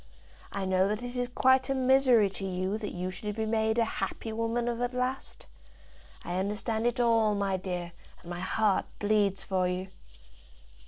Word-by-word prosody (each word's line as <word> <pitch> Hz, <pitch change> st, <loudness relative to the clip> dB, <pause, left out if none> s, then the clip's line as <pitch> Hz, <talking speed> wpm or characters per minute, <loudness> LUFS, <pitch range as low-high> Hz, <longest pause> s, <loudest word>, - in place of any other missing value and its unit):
I 200 Hz, -1 st, -3 dB
know 185 Hz, 0 st, +3 dB
that 210 Hz, +3 st, -2 dB
it 245 Hz, 0 st, -5 dB
is 245 Hz, 0 st, 0 dB
quite 260 Hz, +1 st, +4 dB
a 270 Hz, -, +1 dB
misery 260 Hz, -4 st, +5 dB
to 195 Hz, -, -5 dB
you 190 Hz, +2 st, -2 dB
that 210 Hz, -, -4 dB
you 180 Hz, +1 st, -3 dB
should 210 Hz, +2 st, -5 dB
be 220 Hz, 0 st, -1 dB
made 220 Hz, 0 st, +1 dB
a 230 Hz, -, +4 dB
happy 220 Hz, 0 st, -4 dB
woman 230 Hz, +2 st, -1 dB
of 240 Hz, 0 st, -2 dB
at 245 Hz, +1 st, -1 dB
last. 255 Hz, +1 st, -3 dB, 0.8 s
I 175 Hz, +1 st, -2 dB
understand 215 Hz, +3 st, -1 dB
it 240 Hz, +1 st, -1 dB
all, 225 Hz, -3 st, +3 dB
my 200 Hz, -1 st, 0 dB
dear, 180 Hz, -2 st, -4 dB, 0.3 s
and -, -, -15 dB
my 175 Hz, -, -4 dB
heart 205 Hz, +2 st, +1 dB
bleeds 205 Hz, -2 st, +1 dB
for 185 Hz, -2 st, 0 dB
you." 180 Hz, +1 st, -3 dB
215 Hz, 180 wpm, -29 LUFS, 190-240 Hz, 0.8 s, misery